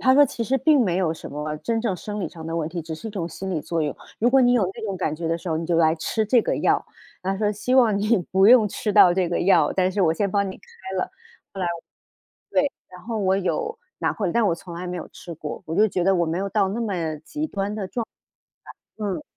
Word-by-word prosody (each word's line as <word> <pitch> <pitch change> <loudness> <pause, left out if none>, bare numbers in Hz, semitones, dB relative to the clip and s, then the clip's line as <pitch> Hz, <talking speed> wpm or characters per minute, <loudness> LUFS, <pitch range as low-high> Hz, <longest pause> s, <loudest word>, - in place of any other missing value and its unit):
他 260 0 +5
说： 290 +1 +8
“其 235 - -4
实 265 +4 +1
并 300 0 +4
没 180 -6 +1
有 165 -4 +1
什 - - -9
么 150 +1 -4
真 230 +4 -1
正 220 -5 0
生 210 +3 -5
理 - - -2
上 160 -2 -11
的 165 0 -3
问 160 -1 -1
题， 170 -1 -5
只 160 0 -6
是 220 +8 -7
一 - - -7
种 175 -5 -4
心 190 +4 -6
理 165 -5 -1
作 165 +1 -2
用。 145 - -2 0.2
如 235 - +3
果 270 0 +5
你 245 0 +5
有 205 -7 +3
那 - - -9
种 195 -3 -3
感 155 -4 -1
觉 165 +1 -4
的 165 +1 0
时 180 - -7
候， 160 - 0
你 165 - -3
就 170 -2 +1
来 160 -1 +4
吃 215 +7 -1
这 240 +1 +4
个 - - -1
药。” - - +2 0.4
他 195 +1 -1
说： 210 0 +1
“希 250 +5 -1
望 230 -6 +5
你 215 +3 +3 0.2
不 190 +1 +5
用 235 -4 +7
吃 210 +2 -2
到 175 -2 +7
这 185 -2 +1
个 175 - -1
药， 195 - +4
但 185 -1 +2
是 195 0 0
我 160 -2 +4
先 200 +2 -1
帮 200 -1 +1
你 - - -10
开 190 0 -9
了。” - - -2 0.4
后 195 - -5
来 180 - 0 0.8
对， 280 0 +2 0.2
然 180 0 -12
后 225 -1 -3
我 190 -1 +2
有 455 - -2 0.2
拿 - - 0
回 205 - -2
来， 170 - -1
但 235 - +2
我 170 - +2
从 170 0 -10
来 180 +1 -5
没 180 0 -4
有 170 - -6
吃 175 - -10
过， 150 -1 -7
我 160 - -3
就 215 +1 +6
觉 180 -2 -1
得 195 0 +4
我 170 -2 +1
没 165 +3 -1
有 200 +1 -2
到 200 -2 +2
那 220 +5 -3
么 170 -8 -2
极 305 +1 -3
端 200 -5 -3
的 200 -3 -3
状 230 +4 -3 0.9
态， 215 - -5
嗯。 200 +10 -3
190 Hz, 300 characters per minute, -24 LUFS, 170-220 Hz, 0.9 s, 说